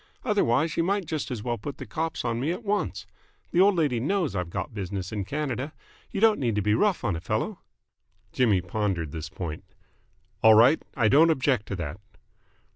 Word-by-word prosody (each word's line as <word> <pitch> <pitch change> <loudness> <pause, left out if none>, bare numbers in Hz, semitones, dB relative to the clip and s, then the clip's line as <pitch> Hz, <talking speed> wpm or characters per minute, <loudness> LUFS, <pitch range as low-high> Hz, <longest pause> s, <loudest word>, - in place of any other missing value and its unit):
Otherwise 165 - +1
you 165 - +3
might 195 +1 0
just 155 -2 -3
as 115 -5 -4
well 120 -1 -2
put 140 +6 -6
the 130 - -7
cops 160 +4 -3
on 115 -1 -1
me 145 +6 0
at 180 +7 -5
once. 210 -1 -1 0.5
The 175 - +4
old 200 0 +5
lady 145 -8 +1
knows 165 - 0
I've 90 -2 -2
got 85 - -4
business 95 -2 -4
in 105 -3 -3
Canada. 140 +2 -3 0.4
You 200 - -4
don't 220 0 +4
need 120 -5 0
to 105 - +1
be 105 +1 +2
rough 200 - +2
on 105 -7 0
a 80 - -5
fellow." - - -2 0.7
Jimmy 110 -7 +2
pondered 90 -4 -2
this 80 -1 -6
point. 80 -4 -6 0.8
"All 110 -1 +8
right. 125 +8 +6 0.2
I 115 -4 +3
don't 155 +8 +6
object 130 -7 +1
to 100 - -3
that." 85 0 -5
120 Hz, 200 wpm, -26 LUFS, 105-160 Hz, 0.8 s, All